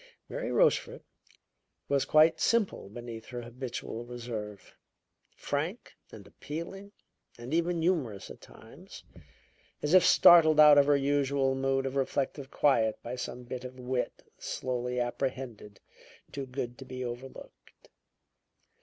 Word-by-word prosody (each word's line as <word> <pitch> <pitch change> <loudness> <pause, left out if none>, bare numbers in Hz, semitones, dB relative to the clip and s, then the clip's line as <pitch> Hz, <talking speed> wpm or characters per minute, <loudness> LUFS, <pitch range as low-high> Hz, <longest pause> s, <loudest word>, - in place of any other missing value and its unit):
Mary - - -4
Rochefort 485 -1 +2 0.8
was 140 -1 +1
quite 155 +1 +4
simple 220 - 0
beneath 115 0 -9
her 120 -1 -6
habitual 120 -1 -6
reserve; 115 -4 -7 0.6
frank - - -4 0.2
and - - -12
appealing 190 +6 -8 0.5
and 120 +4 -7
even 170 0 0
humorous 135 - -1
at - - -13
times, - - -14 0.8
as 150 +3 0
if 185 - +7
startled 160 -3 +7
out 150 -1 +9
of 140 - +4
her 145 -1 +4
usual 140 -1 +1
mood 135 0 0
of 135 0 -4
reflective 135 0 -2
quiet 115 -8 +2
by 120 +2 -5
some 125 0 -6
bit 125 +1 -7
of 130 0 -9
wit, 125 0 -3 0.2
slowly 125 0 -3
apprehended, 120 -4 -4 0.5
too 135 -1 -6
good 125 -2 -5
to 135 - -9
be 130 -1 -6
overlooked. 125 +2 -10
130 Hz, 125 wpm, -29 LUFS, 120-150 Hz, 0.8 s, out